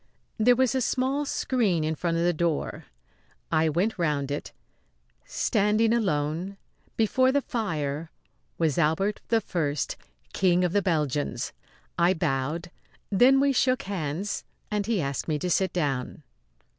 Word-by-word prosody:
There 245 Hz, +3 st, +5 dB
was 260 Hz, 0 st, +2 dB
a 260 Hz, -, +1 dB
small 270 Hz, +4 st, 0 dB
screen 210 Hz, -15 st, +1 dB
in 155 Hz, +1 st, 0 dB
front 165 Hz, +1 st, -1 dB
of 170 Hz, -, +1 dB
the 175 Hz, 0 st, +3 dB
door. 165 Hz, -2 st, -2 dB, 0.7 s
I 160 Hz, -1 st, +3 dB
went 185 Hz, +7 st, 0 dB
round 145 Hz, -4 st, 0 dB
it. 145 Hz, -, -4 dB, 0.7 s
Standing 215 Hz, +1 st, +2 dB
alone 180 Hz, -2 st, -1 dB, 0.4 s
before 255 Hz, +4 st, +3 dB
the 285 Hz, -, +3 dB
fire 160 Hz, -, -3 dB, 0.5 s
was 160 Hz, -2 st, +1 dB
Albert 185 Hz, +7 st, +1 dB
I, 170 Hz, -10 st, 0 dB, 0.6 s
King 180 Hz, -1 st, +3 dB
of 180 Hz, -, +1 dB
the 205 Hz, -, +3 dB
Belgians. 150 Hz, -6 st, -1 dB, 0.5 s
I 175 Hz, +2 st, +4 dB
bowed; 160 Hz, +2 st, -2 dB, 0.4 s
then 250 Hz, +7 st, +5 dB
we 280 Hz, 0 st, +3 dB
shook 255 Hz, +1 st, +2 dB
hands 180 Hz, 0 st, -3 dB, 0.3 s
and 210 Hz, -1 st, -1 dB
he 225 Hz, -4 st, +1 dB
asked 140 Hz, -2 st, -3 dB
me 155 Hz, -2 st, 0 dB
to 180 Hz, +4 st, -2 dB
sit 190 Hz, +1 st, +2 dB
down. 145 Hz, -3 st, -2 dB
175 Hz, 140 wpm, -26 LUFS, 155-220 Hz, 0.7 s, There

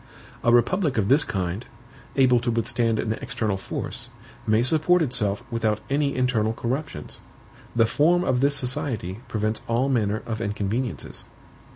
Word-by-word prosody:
"A 120 Hz, -, +4 dB
republic 135 Hz, -, +3 dB
of 105 Hz, -2 st, +1 dB
this 145 Hz, +3 st, +6 dB
kind, 95 Hz, +2 st, -3 dB, 0.5 s
able 130 Hz, -3 st, +5 dB
to 120 Hz, +1 st, -2 dB
withstand 115 Hz, 0 st, +1 dB
an 110 Hz, -, -1 dB
external 105 Hz, -3 st, -1 dB
force, 95 Hz, -, -3 dB, 0.4 s
may 110 Hz, +2 st, +3 dB
support 160 Hz, +6 st, +3 dB
itself 120 Hz, -5 st, -1 dB
without 110 Hz, -2 st, 0 dB
any 140 Hz, 0 st, +1 dB
internal 115 Hz, -4 st, +1 dB
corruptions. 120 Hz, -, -4 dB, 0.6 s
The 115 Hz, -1 st, +5 dB
form 170 Hz, +9 st, +3 dB
of 130 Hz, -8 st, +1 dB
this 140 Hz, +2 st, +2 dB
society 125 Hz, -, -1 dB
prevents 110 Hz, 0 st, -1 dB
all 120 Hz, +4 st, +1 dB
manner 110 Hz, -4 st, 0 dB
of 110 Hz, -1 st, -4 dB
inconveniences." 105 Hz, +3 st, -3 dB
120 Hz, 145 wpm, -24 LUFS, 110-135 Hz, 0.6 s, this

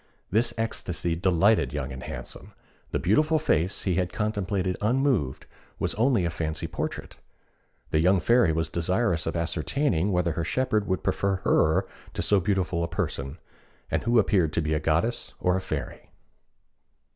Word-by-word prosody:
This 110 Hz, +5 st, +2 dB
ecstasy 90 Hz, -6 st, -2 dB
delighted 90 Hz, -, +3 dB
Young 70 Hz, -2 st, -3 dB
and 65 Hz, -, -7 dB
Handsome. -, -, -8 dB, 0.4 s
The -, -, -1 dB
beautiful 155 Hz, -, +2 dB
face 95 Hz, -, 0 dB
he 90 Hz, -3 st, 0 dB
had 90 Hz, -1 st, 0 dB
contemplated 100 Hz, -3 st, -1 dB
unmoved 120 Hz, -, +1 dB, 0.3 s
was -, -, -1 dB
only 115 Hz, -4 st, +2 dB
a 85 Hz, -, -1 dB
fancy 80 Hz, -1 st, -3 dB
portrait. -, -, -5 dB, 0.7 s
The 75 Hz, -, +3 dB
young 90 Hz, +4 st, +4 dB
Fairy 120 Hz, -3 st, +4 dB
was 80 Hz, +1 st, 0 dB
desirous 90 Hz, 0 st, 0 dB
of 80 Hz, -, -2 dB
ascertaining 85 Hz, -, 0 dB
whether 90 Hz, -2 st, +1 dB
her 85 Hz, -, -2 dB
shepherd 110 Hz, +1 st, 0 dB
would 95 Hz, -, -1 dB
prefer 100 Hz, +1 st, 0 dB
her 80 Hz, 0 st, +3 dB, 0.3 s
to -, -, -1 dB
so 100 Hz, -, +4 dB
beautiful 90 Hz, -3 st, 0 dB
a -, -, -1 dB
person, 80 Hz, -5 st, -3 dB, 0.5 s
and -, -, +1 dB
who 120 Hz, +1 st, +2 dB
appeared 95 Hz, -7 st, +3 dB
to 85 Hz, -, +1 dB
be 75 Hz, 0 st, 0 dB
a 75 Hz, -, +1 dB
goddess 85 Hz, +11 st, -1 dB
or 90 Hz, 0 st, +2 dB
a 95 Hz, -, -1 dB
fairy. -, -, -5 dB
90 Hz, 160 wpm, -26 LUFS, 80-105 Hz, 0.7 s, young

